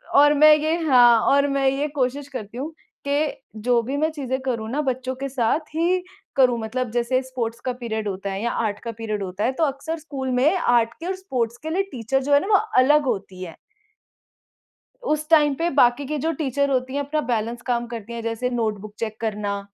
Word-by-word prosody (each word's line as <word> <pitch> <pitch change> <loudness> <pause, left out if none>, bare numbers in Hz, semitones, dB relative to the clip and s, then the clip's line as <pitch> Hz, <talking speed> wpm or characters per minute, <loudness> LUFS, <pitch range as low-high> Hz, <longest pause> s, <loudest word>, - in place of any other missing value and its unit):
और 290 +1 +7
मैं 305 +1 +7
ये 310 +2 0
हाँ, 245 -6 +6
और 280 +1 +3
मैं 275 -1 +1
ये 275 +3 -1
कोशिश 280 0 -2
करती 235 -4 -7
हूँ 295 +5 -4 0.4
कि 290 +1 0 0.3
जो 240 -1 +3
भी 270 +5 -3
मैं 310 +2 +1
चीज़ें 265 -4 -3
करूँ 235 -4 -3
ना, 295 +3 0
बच्चों 260 -1 -2
के 275 +1 -4
साथ 255 +2 +1 0.2
ही 355 +3 +1 0.3
करूँ। 250 -3 +4
मतलब 240 +2 -3
जैसे 245 +2 +1
स्पोर्ट्स 235 -3 -4
का 255 - 0
पीरियड 220 -3 -3
होता 195 0 -4
है 195 - -4
या 235 - 0
आर्ट 205 0 -2
का 230 - -4
पीरियड 215 -2 -4
होता 190 +3 -4
है, 250 - +2
तो 320 +5 -1
अक्सर 300 +3 -2
स्कूल 275 -4 -5
में 270 +8 +3
आर्ट 235 -4 +2
के 330 - -7
और 380 - -1
स्पोर्ट्स 245 - -3
के 315 - -4
लिए 370 +5 +1
टीचर, 260 +2 -1
जो 285 - +1
है 285 - +7
ना, - - -5
वो 410 -2 +5 0.3
अलग 295 +3 +4
होती 190 -6 -3
है। 165 -3 -8 1.5
उस 305 -5 -1
टाइम 295 -3 +5
पे 340 - +1
बाकी 245 +2 +4
की 300 +3 -3
जो 330 - +2
टीचर 280 -2 -1
होती 260 0 -1
हैं, - - 0
अपना 300 +2 -1
बैलेंस 230 +2 -2
काम 240 -1 0
करती 230 -1 -7
हैं, 230 - -5
जैसे 230 +2 -2
नोटबुक 215 -4 -3
चेक 220 -1 -4
करना। 205 -2 -2
255 Hz, 215 wpm, -23 LUFS, 230-290 Hz, 1.5 s, और